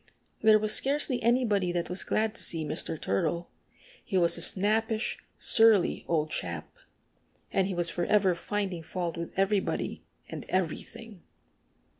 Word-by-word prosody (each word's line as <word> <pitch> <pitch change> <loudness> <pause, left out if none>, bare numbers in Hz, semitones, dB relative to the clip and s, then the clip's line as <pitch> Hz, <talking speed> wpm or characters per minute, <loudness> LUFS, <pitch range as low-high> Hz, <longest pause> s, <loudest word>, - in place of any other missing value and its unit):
There 220 -1 +6
was 215 0 +2
scarcely 275 -2 +2
anybody 225 -6 +2
that 175 -1 -1
was 180 +2 0
glad 215 0 0
to - - -4
see 160 -2 +1
Mr. 155 +1 -3
Turtle. 170 - -2 0.5
He 195 - -2
was 170 -2 +3
a - - -5
snappish, 220 +3 0 0.2
surly 225 -5 +4
old 155 -2 0
chap. 85 -3 -4 0.8
And 190 - +1
he 190 - -3
was 175 -1 0
forever 190 +1 +2
finding 190 0 -3
fault 170 +1 -4
with 170 0 -5
everybody 195 0 0 0.2
and - - -7
everything. 190 +3 -3
190 Hz, 140 wpm, -28 LUFS, 170-220 Hz, 0.8 s, There